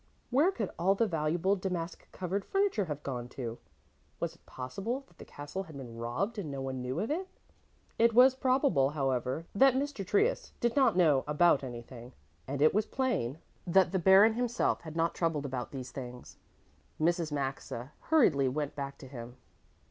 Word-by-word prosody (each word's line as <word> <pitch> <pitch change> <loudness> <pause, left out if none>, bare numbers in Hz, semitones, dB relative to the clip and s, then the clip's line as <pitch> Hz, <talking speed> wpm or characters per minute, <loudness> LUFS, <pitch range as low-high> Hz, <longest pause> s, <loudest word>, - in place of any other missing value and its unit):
Where 295 +9 +4
could 220 - -3
all 190 +3 +3
the 230 - +2
valuable 170 +2 +1
damask 180 -3 -4
covered 190 +2 -3
furniture 390 - +1
have 150 -2 -5
gone 125 -3 -4
to? 120 -3 -4 0.6
Was - - -2
it - - -24
possible 195 - -4
that - - -27
the - - -9
castle 145 +6 -6
had 160 -6 -10
been 120 -4 -8
robbed 125 - -2
and 170 -7 -4
no 140 -1 -5
one 130 -1 -4
knew 130 +5 -3
of 220 +8 -2
it? 370 +5 -2 0.7
It 230 0 +4
was 255 +2 +8
probable, 260 - +2
however, 135 0 -1
that 265 +4 +5
Mr. 275 -5 -2
Trius 430 - +1
did 235 -1 0
not 255 -9 +4
know 150 -7 +4
about 150 -1 +4
anything, 120 -1 -8 0.3
and 140 +1 0
it 155 - +5
was 210 +2 +1
plain 240 - -1 0.3
that 180 0 +4
the 190 - +1
Baron 195 +5 +7
himself 240 0 0
had 160 -1 -9
not 165 0 +1
troubled 160 -4 -1
about 130 -2 -4
these 130 -2 -7
things. 125 -2 -8 0.6
Mrs. 170 0 +1
Maxa 135 -2 -4 0.2
hurriedly 160 - +4
went 145 +2 -2
back 140 -1 -5
to 135 - -11
him. 120 -1 -9
165 Hz, 180 wpm, -31 LUFS, 135-215 Hz, 0.7 s, was